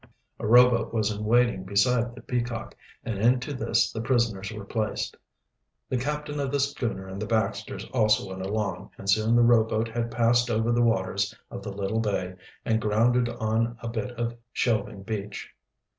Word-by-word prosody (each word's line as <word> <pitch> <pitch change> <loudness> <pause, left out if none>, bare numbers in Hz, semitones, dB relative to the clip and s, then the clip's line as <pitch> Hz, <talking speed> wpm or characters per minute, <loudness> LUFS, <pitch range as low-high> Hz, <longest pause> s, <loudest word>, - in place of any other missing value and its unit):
A - - -3
rowboat 120 0 +5
was 110 -1 +1
in 105 0 -4
waiting 120 -3 +3
beside 115 +5 +1
the 115 - -12
Peacock, 120 -2 -3 0.3
and 110 -4 -3
into 125 +5 +2
this 115 -2 +1
the 110 - -4
prisoners 115 -5 0
were 105 -2 -7
placed. 110 0 -2 0.7
The 130 - 0
captain 150 +2 -3
of 140 -2 -1
the 140 - +1
schooner 120 -8 -2
and 95 +1 -6
the 110 - -3
Baxters 110 -1 -1
also 110 -5 +3
went 95 0 -6
along, 100 0 -3
and 95 - -9
soon 110 +4 +3
the 120 - +6
rowboat 115 -1 +3
had 115 +1 -2
passed 120 +1 +2
over 115 +1 +1
the 120 0 +2
waters 100 -3 +1 0.2
of - - -6
the 100 - -6
little 100 +2 -2
bay 100 -4 -1 0.3
and 110 -1 +1
grounded 120 +3 +2
on 115 +1 -1
a - - -3
bit 115 0 -3
of 120 0 -3 0.2
shelving 105 -4 -1
beach. 105 -1 -5
115 Hz, 175 wpm, -26 LUFS, 105-120 Hz, 0.7 s, the